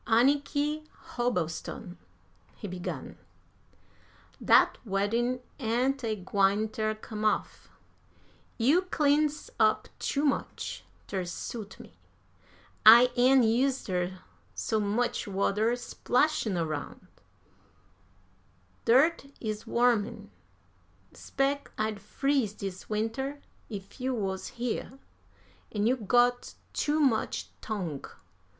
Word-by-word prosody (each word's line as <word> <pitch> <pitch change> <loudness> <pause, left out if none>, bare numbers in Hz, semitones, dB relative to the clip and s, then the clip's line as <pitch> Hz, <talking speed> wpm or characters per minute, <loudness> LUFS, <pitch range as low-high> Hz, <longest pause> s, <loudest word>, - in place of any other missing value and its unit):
"Anniky 290 +5 +2 0.3
Hobbleston," 185 - -2 0.6
he - - -7
began, 180 -1 -6 1.2
"dat - - +5
weddin' 230 +4 0 0.2
ain't 255 +3 0
a 220 -2 0
gwine 200 +2 +1
ter 215 0 -1
come 215 0 -7
off. 215 - -1 0.9
You 280 +10 +4
cleans 300 -4 +1
up 215 -1 +3
too 285 +1 0
much 280 - -2 0.2
ter 190 -2 -3
suit 205 +4 -6
me. - - -14 0.8
I 235 +3 +9
ain't 255 +1 +5
used 255 +4 +2
ter 180 0 -2 0.4
so 215 - 0
much 215 +4 0
water 205 +4 +1
splashin' 245 - 0
aroun'. 155 -4 -4 1.8
Dirt 275 +5 +4
is 215 -1 -4
warmin'. 230 -3 +1 0.8
'Spec 280 +1 -1
I'd 215 -1 -1
freeze 265 0 0
dis 195 -3 -7
winter 225 +7 -2 0.3
if 200 +2 -8
you 260 0 0
wuz 190 -4 -3
here. 245 +2 -3 0.7
An' 210 -1 0
you 245 +3 +4
got 245 +2 +2 0.2
too 300 +1 +1
much 260 -7 +1
tongue. 180 -10 -4
230 Hz, 100 wpm, -29 LUFS, 205-265 Hz, 1.8 s, I